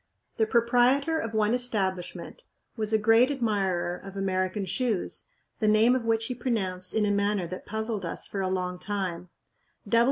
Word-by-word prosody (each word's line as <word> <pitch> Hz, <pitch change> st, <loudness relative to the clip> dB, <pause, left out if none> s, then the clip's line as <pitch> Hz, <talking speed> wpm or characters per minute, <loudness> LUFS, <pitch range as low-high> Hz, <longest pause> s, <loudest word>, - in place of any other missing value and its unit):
The 220 Hz, -, +2 dB
proprietor 250 Hz, +7 st, +3 dB
of 225 Hz, -4 st, -4 dB
one 215 Hz, +1 st, +2 dB
establishment 205 Hz, -, -3 dB, 0.3 s
was 215 Hz, -2 st, -2 dB
a 220 Hz, -, +4 dB
great 225 Hz, +4 st, +5 dB
admirer 200 Hz, -9 st, 0 dB
of 195 Hz, 0 st, -9 dB
American 190 Hz, +1 st, -1 dB
shoes, 200 Hz, +2 st, -2 dB, 0.3 s
the 215 Hz, -, +1 dB
name 215 Hz, +3 st, +5 dB
of 250 Hz, -3 st, -2 dB
which 225 Hz, 0 st, +2 dB
he 250 Hz, -, -3 dB
pronounced 195 Hz, -7 st, -2 dB
in 215 Hz, -1 st, +3 dB
a 205 Hz, -, +1 dB
manner 200 Hz, -2 st, +1 dB
that 185 Hz, +2 st, -7 dB
puzzled 220 Hz, -1 st, -3 dB
us 170 Hz, -, -4 dB
for 195 Hz, -, -4 dB
a 190 Hz, -, 0 dB
long 180 Hz, -1 st, -2 dB
time. 180 Hz, -4 st, -3 dB
210 Hz, 165 wpm, -27 LUFS, 185-230 Hz, 0.3 s, great